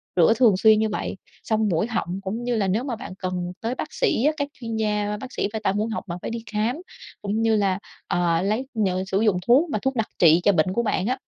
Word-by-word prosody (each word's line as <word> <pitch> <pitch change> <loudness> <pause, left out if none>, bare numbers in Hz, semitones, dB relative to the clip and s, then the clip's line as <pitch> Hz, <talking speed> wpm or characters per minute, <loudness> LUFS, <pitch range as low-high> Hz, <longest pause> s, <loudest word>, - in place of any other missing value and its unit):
Rửa 175 +5 +5
thường 225 -7 +5
xuyên 215 +1 +5
như 220 0 +1
vậy, 205 - -4 0.3
xông 220 -1 +1
mũi 170 +6 +1
họng, 195 -5 -2
cũng 215 +5 -4
như 245 -1 0
là 200 -3 +1
nếu 215 +7 0
mà 255 -4 -3
bạn 230 -5 -8
cần 180 -1 -3
tới 235 +3 -2
bác - - -6
sĩ 455 - +1
á, 305 - +5
các 285 -1 -1
chuyên 230 -3 -6
gia, 210 -1 0
bác 260 0 -8
sĩ - - 0
về 220 - -2
tai 195 - +2
mũi 215 +2 -1
họng, - - -4
bạn 175 +1 -5
phải - - -4
đi 230 -1 -5
khám, 220 +5 0 0.5
cũng 210 +2 -1
như 225 -1 +3
là, 200 -2 +1 0.3
ờ, 175 -2 +1
lấy, 215 +7 -1 0.2
ờ, 185 0 0
sử 195 +2 0
dụng 210 -5 +3
thuốc 285 +8 +5
mà 215 - -1
thuốc 265 -1 -1
đặc 225 -2 0
trị 165 0 +6
cho 205 - +5
bệnh 185 +1 +1
của 235 - 0
bạn 205 -2 0
á, 255 +1 0
215 Hz, 265 wpm, -24 LUFS, 190-230 Hz, 0.5 s, trị